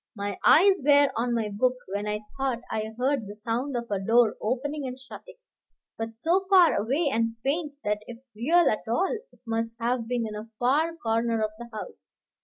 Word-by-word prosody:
My 200 Hz, -2 st, -4 dB
eyes 380 Hz, +1 st, +6 dB
were 285 Hz, 0 st, +5 dB
on 235 Hz, +1 st, 0 dB
my 220 Hz, -2 st, -1 dB
book, 250 Hz, +5 st, +1 dB, 0.2 s
when 205 Hz, +1 st, -2 dB
I 210 Hz, 0 st, -2 dB
thought 265 Hz, -3 st, -1 dB
I 220 Hz, 0 st, -3 dB
heard 255 Hz, -3 st, 0 dB
the 205 Hz, -, -8 dB
sound 240 Hz, +5 st, -2 dB
of 235 Hz, -2 st, -6 dB
a 200 Hz, -, 0 dB
door 225 Hz, +3 st, +3 dB
opening 275 Hz, +5 st, -2 dB
and 255 Hz, 0 st, -6 dB
shutting, 270 Hz, -, -12 dB, 0.6 s
but 225 Hz, 0 st, -6 dB
so 360 Hz, +9 st, +1 dB
far 370 Hz, -4 st, +7 dB
away 270 Hz, +10 st, 0 dB
and 230 Hz, 0 st, 0 dB
faint 295 Hz, +2 st, -1 dB
that 210 Hz, 0 st, -1 dB
if 240 Hz, -, -8 dB, 0.2 s
real 325 Hz, +10 st, +3 dB
at 215 Hz, -, 0 dB
all 365 Hz, -, +1 dB, 0.2 s
it -, -, -24 dB
must 230 Hz, 0 st, -2 dB
have 235 Hz, 0 st, -1 dB
been 240 Hz, -1 st, -1 dB
in 215 Hz, -, -5 dB
a 210 Hz, +2 st, -7 dB
far 300 Hz, +8 st, +1 dB
corner 230 Hz, -4 st, 0 dB
of 215 Hz, -, -1 dB
the 240 Hz, 0 st, -8 dB
house. 345 Hz, -, -9 dB
235 Hz, 200 wpm, -27 LUFS, 220-285 Hz, 0.6 s, far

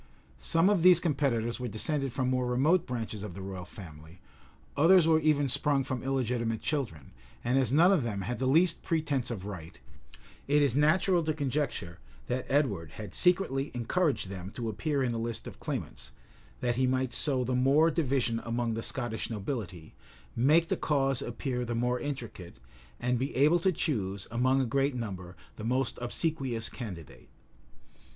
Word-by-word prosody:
[*] 65 Hz, -1 st, -29 dB
Some 165 Hz, -, +2 dB
of 200 Hz, -4 st, +3 dB
these 180 Hz, -1 st, +7 dB
competitors 135 Hz, -9 st, 0 dB
were 125 Hz, -, -3 dB
descended 135 Hz, +5 st, -2 dB
from 130 Hz, 0 st, -1 dB
more 125 Hz, -1 st, 0 dB
remote 150 Hz, +9 st, +2 dB
branches 115 Hz, -4 st, -4 dB
of 105 Hz, -4 st, -7 dB
the 95 Hz, -, -7 dB
royal 95 Hz, -2 st, -6 dB
family; 80 Hz, -2 st, -12 dB, 0.6 s
others 170 Hz, +4 st, +6 dB
were 160 Hz, -1 st, +4 dB
even 150 Hz, -2 st, +2 dB
sprung 135 Hz, +1 st, +1 dB
from 130 Hz, -2 st, -4 dB
illegitimate 120 Hz, -4 st, -1 dB
children; 115 Hz, -, -3 dB, 0.3 s
and 120 Hz, +2 st, +1 dB
as 125 Hz, -4 st, +2 dB
none 165 Hz, +7 st, +6 dB
of 190 Hz, -6 st, +3 dB
them 105 Hz, -5 st, -3 dB
had 120 Hz, +6 st, -4 dB
the 130 Hz, -, 0 dB
least 165 Hz, +5 st, +4 dB
pretence 150 Hz, -7 st, -1 dB
of 100 Hz, -6 st, -5 dB
right, 85 Hz, -4 st, -8 dB, 0.7 s
it 145 Hz, +1 st, +4 dB
is 135 Hz, -4 st, +1 dB
natural 170 Hz, +5 st, +3 dB
to 155 Hz, -1 st, -1 dB
conjecture 135 Hz, -, -2 dB, 0.3 s
that 125 Hz, +1 st, -3 dB
Edward 105 Hz, -, 0 dB
had 105 Hz, -4 st, -8 dB
secretly 175 Hz, -7 st, +2 dB
encouraged 140 Hz, -, 0 dB
them 95 Hz, -1 st, -6 dB
to 115 Hz, +2 st, -4 dB
appear 140 Hz, -, -1 dB
in 125 Hz, -, 0 dB
the 115 Hz, -, -2 dB
list 115 Hz, -1 st, -1 dB
of -, -, -9 dB
claimants, -, -, -5 dB, 0.5 s
that 120 Hz, -1 st, 0 dB
he 130 Hz, 0 st, +2 dB
might 130 Hz, -1 st, 0 dB
sow 135 Hz, -4 st, +1 dB
the 125 Hz, +1 st, -2 dB
more 140 Hz, +6 st, +4 dB
division 135 Hz, -7 st, 0 dB
among 115 Hz, 0 st, -1 dB
the 115 Hz, -, -3 dB
Scottish 120 Hz, -2 st, -3 dB
nobility, 100 Hz, -, -5 dB, 0.4 s
make 150 Hz, +8 st, +4 dB
the -, -, 0 dB
cause 135 Hz, -3 st, +1 dB
appear 125 Hz, -4 st, -3 dB
the 120 Hz, -1 st, -3 dB
more 125 Hz, +1 st, 0 dB
intricate, 120 Hz, -11 st, -6 dB, 0.4 s
and 125 Hz, 0 st, 0 dB
be 135 Hz, +2 st, -3 dB
able 150 Hz, +6 st, +4 dB
to 190 Hz, +3 st, +2 dB
choose, 100 Hz, -, -2 dB
among 130 Hz, +3 st, +2 dB
a 135 Hz, -, +1 dB
great 135 Hz, +3 st, 0 dB
number, 95 Hz, -6 st, -6 dB, 0.2 s
the 110 Hz, -, -7 dB
most 130 Hz, +4 st, 0 dB
obsequious 125 Hz, -3 st, -1 dB
candidate. 85 Hz, -, -9 dB
125 Hz, 175 wpm, -29 LUFS, 115-145 Hz, 0.7 s, these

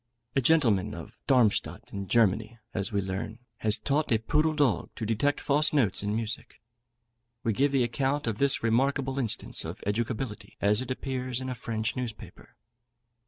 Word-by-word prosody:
A 135 Hz, -, +4 dB
gentleman 120 Hz, -, +3 dB
of -, -, -9 dB
Darmstadt, 125 Hz, -6 st, +2 dB
in 100 Hz, -1 st, -4 dB
Germany, 110 Hz, +1 st, +2 dB, 0.2 s
as 100 Hz, +1 st, -1 dB
we 100 Hz, -1 st, +1 dB
learn, 95 Hz, +3 st, -4 dB, 0.2 s
has 110 Hz, 0 st, +1 dB
taught 140 Hz, +6 st, 0 dB
a 115 Hz, -, +5 dB
poodle 150 Hz, +8 st, +1 dB
dog 145 Hz, -7 st, +2 dB
to 110 Hz, -, -4 dB
detect 115 Hz, +7 st, +1 dB
false 145 Hz, +1 st, +2 dB
notes 120 Hz, -10 st, +2 dB
in 105 Hz, +1 st, -1 dB
music. 115 Hz, -1 st, -4 dB, 0.8 s
We 115 Hz, -, +1 dB
give 140 Hz, +7 st, +2 dB
the 135 Hz, -3 st, +3 dB
account 135 Hz, +4 st, 0 dB
of 115 Hz, -3 st, -2 dB
this 140 Hz, -3 st, +2 dB
remarkable 135 Hz, +3 st, +1 dB
instance 120 Hz, -5 st, 0 dB
of -, -, -6 dB
educability 110 Hz, 0 st, -3 dB
as 105 Hz, +3 st, +3 dB
it 130 Hz, -, -6 dB
appears 130 Hz, -1 st, -2 dB
in 130 Hz, 0 st, -4 dB
a -, -, -1 dB
French 110 Hz, -2 st, -3 dB
newspaper. 120 Hz, -4 st, -7 dB
120 Hz, 165 wpm, -28 LUFS, 110-135 Hz, 0.8 s, a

